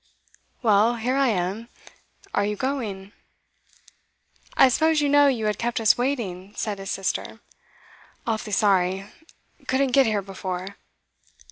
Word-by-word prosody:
'Well, 220 +1 +4
here 240 +3 -1
I 275 -1 +3
am. 205 +2 -2 0.6
Are 205 - +2
you 210 +1 -1
going?' 210 -7 -4 1.5
'I 270 - +7
suppose 315 +4 +2
you 295 - +1
know 290 0 +6
you 240 -6 0
have 210 0 -1
kept 235 0 -1
us 220 -2 +5
waiting,' 210 -7 -3
said 210 -3 -3
his 195 0 -7
sister. 195 +3 -3 0.9
'Awf'ly 220 -1 -2
sorry. 195 -2 +2 0.6
Couldn't 265 0 +1
get 270 -1 +5
here 210 -2 0
before. 190 0 -6
220 Hz, 130 wpm, -24 LUFS, 195-255 Hz, 1.5 s, I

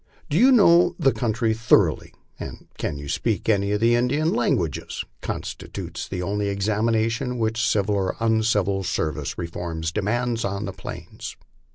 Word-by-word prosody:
Do 155 - +3
you^mow 175 -8 +6
the 135 - +3
country 115 -2 0
thoroughly? 105 - +2 0.3
and - - -8
can 70 - -2
you 70 0 -7
speak - - -1
any 100 -2 +2
of 105 - +1
the 115 +1 +4
Indian 140 +7 +2
languages? 85 - -1 0.2
constitute - - -5
the 90 -1 -3
only 100 +2 -1
examination 110 +5 0
which 115 +1 0
civil 105 -1 +2
or 95 -2 0
uncivil 110 -4 +1
service 80 -4 -2
reform 85 -1 -4
demands 110 +8 -1
on 100 +1 -2
the 100 - -5
plains. - - -8
110 Hz, 145 wpm, -24 LUFS, 95-115 Hz, 0.3 s, you^mow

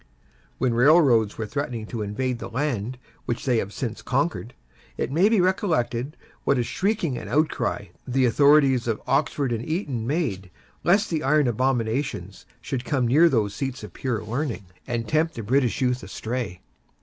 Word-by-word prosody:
When 125 -2 +1
railroads 125 -5 +4
were 110 - -2
threatening 120 -1 -3
to 110 0 -5
invade 120 +4 -2
the - - -6
land 125 -2 -2 0.3
which 120 - -3
they 125 -4 +3
have 100 - -4
since 115 0 -4
conquered, 130 -2 -1 0.4
it - - -2
may 175 +8 +4
be 225 -3 +3
recollected 160 - 0 0.3
what 140 - +2
a 120 - +1
shrieking 180 - -1
and - - -8
outcry 125 - 0 0.2
the 130 +1 +2
authorities 135 -1 +4
of 115 -2 0
Oxford 140 -1 +1
and 115 0 -3
Eton 140 - -2
made, 120 - -1 0.3
lest 200 +4 +3
the 160 -2 0
iron 150 0 +3
abominations 120 -4 -1
should 130 -3 -3
come 125 0 0
near 155 +8 +6
those 105 -7 +1
seats 130 +1 -4
of 105 - -9
pure 120 -5 -2
learning, 120 -1 -3 0.2
and 120 -1 -2
tempt 160 +1 +1
the 115 - -5
British 125 +4 +1
youth 125 -1 +1
astray. 110 -6 -4
125 Hz, 165 wpm, -24 LUFS, 115-145 Hz, 0.4 s, near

